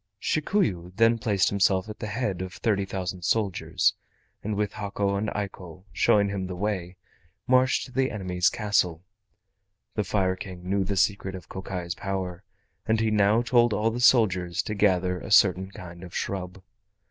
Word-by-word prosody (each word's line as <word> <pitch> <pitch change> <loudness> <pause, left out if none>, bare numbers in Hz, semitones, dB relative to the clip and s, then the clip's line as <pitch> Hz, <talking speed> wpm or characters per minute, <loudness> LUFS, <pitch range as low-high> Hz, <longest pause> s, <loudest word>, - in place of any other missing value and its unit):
Shikuyu 145 - 0
then 115 +2 +4
placed 100 -3 +2
himself 95 -1 +2
at 110 - -8
the 110 - -4
head 100 -4 -2
of 95 0 -5
thirty 100 -3 0
thousand 95 -1 -4
soldiers, 100 +1 +1 0.5
and 105 0 -2
with 105 0 -1
Hako 100 -1 -2
and 105 +2 -1
Eiko 95 -3 -6
showing 100 +4 +3
him 95 -2 -3
the 90 - -5
way, 95 -2 -3 0.5
marched 130 0 +3
to 130 - -13
the 130 +1 +1
enemy's 90 -4 0
castle. 90 -6 0 0.9
The 105 - 0
Fire 95 -1 0
King 90 -1 -9
knew 100 +1 +1
the 100 +1 -2
secret 95 0 +1
of 95 - -10
Kokai's 90 -2 -5
power, 95 -2 -4 0.4
and 110 0 +2
he 110 -1 +1
now 105 +2 +3
told 120 -2 +3
all 110 +2 +1
the 120 - -4
soldiers 95 -9 +3
to 105 - -4
gather 90 -3 +2
a - - -8
certain 95 -2 +4
kind 85 -2 -10
of 90 - -10
shrub. 95 -1 -4
100 Hz, 170 wpm, -26 LUFS, 90-105 Hz, 0.9 s, then